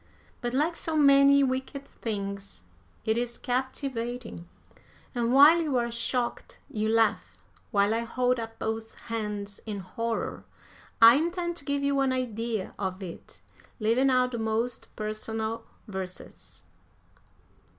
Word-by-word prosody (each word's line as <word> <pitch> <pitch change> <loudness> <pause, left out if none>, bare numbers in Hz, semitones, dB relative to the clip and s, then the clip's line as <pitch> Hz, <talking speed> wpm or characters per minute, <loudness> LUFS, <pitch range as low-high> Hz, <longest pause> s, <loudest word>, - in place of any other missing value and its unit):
But 240 0 -2
like 315 +5 +1
so 325 -1 -3
many 280 -1 +6
wicked 265 +1 -2
things 200 - -5 0.4
it 220 +1 +2
is 240 0 -3
captivating, 245 - -3 0.6
and 240 -2 0
while 295 +6 +8
you 295 -5 0
are 235 -1 0
shocked, 240 +1 -2
you 215 0 -1
laugh. 225 -1 +1 0.3
While 200 +1 +3
I 225 - +1
hold 250 +1 0
up 225 0 -6
both 220 0 -4
hands 210 -3 -5
in 210 -2 -3
horror, 225 +5 -3 0.6
I 230 +3 +10
intend 345 +2 -1
to 285 - -10
give 280 -1 -1
you 280 0 +2
an 270 -1 +2
idea 230 -5 -2
of 190 -1 -3
it; 175 -3 -10 0.4
leaving 235 +5 +3
out 255 -1 +3
the 235 - -3
most 225 +2 -1
personal 220 +1 -3 0.2
verses. 190 -2 -8
235 Hz, 130 wpm, -28 LUFS, 220-265 Hz, 0.6 s, I